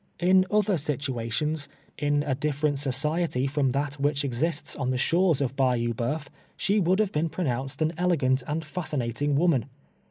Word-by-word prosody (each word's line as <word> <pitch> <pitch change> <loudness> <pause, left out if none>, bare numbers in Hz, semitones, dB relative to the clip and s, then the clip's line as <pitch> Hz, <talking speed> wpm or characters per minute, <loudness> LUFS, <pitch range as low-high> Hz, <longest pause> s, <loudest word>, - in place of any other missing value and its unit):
In 185 +1 +4
other 210 -4 +2
situations 145 +1 -2
— - - -34
in 145 0 +1
a 145 -3 0
ditrercut 145 0 0
society" 145 +1 0
from 140 -1 +1
that 145 +2 -2
M'hich 145 0 +1
exists 145 +4 -2
on 130 -3 -2
the 130 - 0
shores 165 +2 +2
of 135 -1 -1
Uayou 120 -3 +1
Boeuf, 135 +6 -2 0.3
she 205 +1 +2
woukl 185 +1 +3
have 210 -2 +1
been 160 +2 0
pronounced 135 -3 -2
an 155 +2 0
elegant 140 -8 +2
and 155 +2 -2
fascinatins: 145 -4 -2
woman. 155 -7 +3
145 Hz, 165 wpm, -26 LUFS, 130-165 Hz, 0.3 s, In